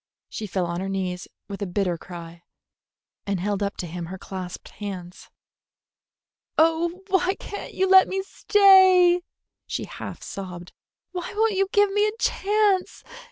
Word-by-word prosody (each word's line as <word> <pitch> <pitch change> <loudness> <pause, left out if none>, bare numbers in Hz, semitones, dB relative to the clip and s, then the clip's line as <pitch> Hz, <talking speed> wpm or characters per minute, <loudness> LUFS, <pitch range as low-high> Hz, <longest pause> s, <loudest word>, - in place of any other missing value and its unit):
She 215 - -5
fell 185 -1 -1
on 170 0 -3
her 190 +1 -3
knees 185 -2 -3 0.2
with 200 0 -7
a 200 - -2
bitter 180 -1 0
cry, 170 0 -10 0.9
and 200 -2 -1
held 200 +2 -2
up 200 0 -2
to - - -4
him 170 0 -6
her 190 +2 -7
clasped 185 -1 -7
hands. 185 -3 -8 1.3
"Oh, 335 +3 +2
why 380 0 +2
can't 405 - -8
you 380 - +2
let 380 0 +7
me 385 0 -2
stay!" 375 -3 +5 0.5
she - - -3
half - - -8
sobbed. 180 -3 -7 0.4
"Why 360 -1 -5
won't 440 0 +2
you 390 0 +1
give 410 -1 +4
me 415 +1 +2
a 425 +1 -4
chance? 410 -3 +1
210 Hz, 155 wpm, -24 LUFS, -, 1.3 s, let